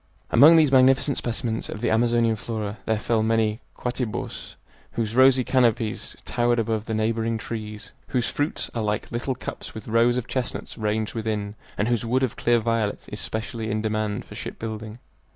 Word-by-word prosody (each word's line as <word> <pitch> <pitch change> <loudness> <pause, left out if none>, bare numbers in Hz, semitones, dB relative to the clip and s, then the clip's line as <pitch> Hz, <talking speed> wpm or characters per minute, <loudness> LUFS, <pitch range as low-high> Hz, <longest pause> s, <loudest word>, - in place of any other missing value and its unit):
Among 150 +7 +8
these 155 -4 +5
magnificent 130 +1 +4
specimens 115 -1 -2
of - - -5
the 120 - 0
Amazonian 115 0 +3
flora 105 -2 -4
there 110 - +2
fell 110 +1 +1
many 110 0 +1 0.2
"quatibos" 125 -3 -4 0.4
whose 115 -1 -2
rosy 130 0 +6
canopies 115 -4 +1
towered 120 0 +1
above 110 -1 -1
the 110 - -2
neighboring 115 +1 0
trees, 105 -1 -6 0.2
whose 125 -2 0
fruits 145 +2 -2
are 115 - -2
like 105 -1 -2
little 120 +3 -2
cups - - -7
with 110 - -8
rows 115 +2 +3
of 125 - -2
chestnuts 125 -2 -3
ranged 110 0 -1
within, 105 -2 -2 0.2
and 105 - +1
whose 120 -2 +1
wood 125 +3 +1
of 130 - 0
clear 120 0 +3
violet 115 -2 -1
is - - -4
specially 110 0 -4
in 110 0 -1
demand 110 -1 -1
for - - -12
ship - - -6
building. 110 0 -6
115 Hz, 175 wpm, -25 LUFS, 110-120 Hz, 0.4 s, Among